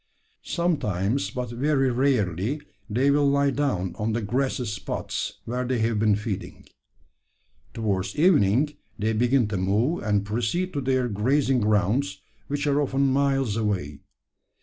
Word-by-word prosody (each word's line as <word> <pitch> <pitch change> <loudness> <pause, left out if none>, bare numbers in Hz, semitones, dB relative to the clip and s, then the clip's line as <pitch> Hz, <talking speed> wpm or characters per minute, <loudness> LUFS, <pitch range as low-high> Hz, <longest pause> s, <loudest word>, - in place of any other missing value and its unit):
Sometimes, 135 - -1
but 125 -2 -4
very 135 +1 +1
rarely, 120 - 0 0.3
they 130 +6 +2
will 145 0 +3
lie 140 0 +2
down 115 -11 -1
on 110 +1 0
the 115 - -1
grassy 125 +3 -1
spots 105 -2 -4
where 125 +2 -2
they 125 0 -1
have 110 -1 0
been 105 -1 +3
feeding. 105 -1 -5 1.1
Towards 100 -4 -1
evening 150 - +3 0.2
they 110 +2 0
begin 120 +1 +2
to 100 - -2
move, 105 - +1
and 105 -1 0
proceed 120 - -1
to 140 - -2
their 130 -1 +1
grazing 130 +5 +1
grounds 105 0 +1 0.3
which 145 +1 -2
are 145 0 +2
often 135 -1 +1
miles 135 -5 +1
away. 100 -10 -2
120 Hz, 140 wpm, -25 LUFS, 105-140 Hz, 1.1 s, will